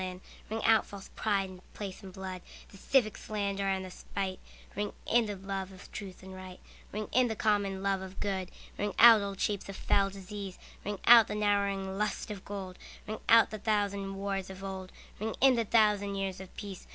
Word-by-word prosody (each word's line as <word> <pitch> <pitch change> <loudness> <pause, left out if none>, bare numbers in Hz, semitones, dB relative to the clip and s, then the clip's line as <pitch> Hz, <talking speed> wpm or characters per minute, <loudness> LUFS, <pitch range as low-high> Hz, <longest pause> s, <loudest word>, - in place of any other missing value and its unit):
Ring 220 +1 -3
out 225 -1 +5
false 200 -1 -10
pride 200 -3 0
in 180 -1 -12
place 200 -2 -6
and 190 -2 -9
blood, 185 -1 -6 0.3
The 195 - -14
civic 215 0 +2
slander 200 -2 -2
and 190 -1 0
the 185 - -9
spite; 190 0 -4 0.4
Ring 205 0 -2
in 235 -1 +3
the 205 - -3
love 195 0 -4
of 190 0 -13
truth 190 -3 -8
and 190 0 -9
right, 185 -1 -9 0.3
Ring 215 +1 -3
in 255 0 +4
the 220 - -2
common 200 -3 +1
love 195 -1 +1
of 190 0 -9
good. 190 -3 -2 0.3
Ring 205 0 -1
out 230 -2 +9
old 200 -1 -4
shapes 200 -2 -1
of 195 - -5
foul 195 0 +2
disease, 195 0 -7 0.3
Ring 205 0 -3
out 230 -2 +9
the - - -3
narrowing 200 -2 0
lust 210 0 -1
of 200 -2 -7
gold; 190 -2 -6 0.3
Ring 215 +1 -4
out 230 -1 +7
the 215 - -5
thousand 200 -2 0
wars 195 -1 -3
of 190 0 -9
old, 190 -1 -6 0.3
Ring 220 +2 -2
in 270 0 +7
the 230 -2 +1
thousand 210 -2 +3
years 195 -1 -3
of 190 - -10
peace. 200 -3 -8
200 Hz, 200 wpm, -31 LUFS, 190-210 Hz, 0.4 s, out